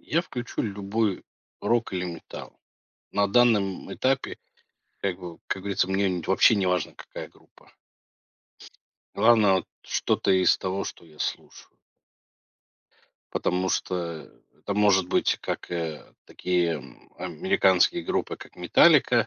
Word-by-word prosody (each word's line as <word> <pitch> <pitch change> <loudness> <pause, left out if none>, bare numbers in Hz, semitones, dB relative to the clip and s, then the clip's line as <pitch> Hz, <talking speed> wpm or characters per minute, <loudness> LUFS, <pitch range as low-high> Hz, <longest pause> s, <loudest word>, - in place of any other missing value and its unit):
Я 165 - 0
включу 125 -7 -5
любой 100 0 -1 0.4
рок 115 -4 +1
или 90 - -1
металл 85 -2 -9 0.5
на 100 0 +2
данном 105 -4 +2
этапе, 135 0 -1 0.6
как 95 -2 -2
бы, 85 -3 -9
как 95 - -3
говорится, 100 -1 0
мне 95 0 +1
не 90 -2 -2
вообще 95 +4 +5
неважно, 90 -3 0
какая - - -9
группа. - - -24 1.4
Главное, 110 -4 +5
вот, 95 - -1 0.2
что-то - - 0
из 95 -1 +4
того, 95 +1 -3
что - - -8
я 80 -2 -19
слушаю. - - -5 1.6
Потому 90 +1 0
что 85 -3 -3 0.3
это 100 - -4
может 100 -3 +3
быть - - +1
как, - - -5
э, 80 -3 -5
такие, 90 -2 0
м, 75 - -12
американские 95 -2 +2
группы, - - -2
как - - -14
Metallica, - - +5
95 Hz, 125 wpm, -26 LUFS, 90-100 Hz, 1.6 s, вообще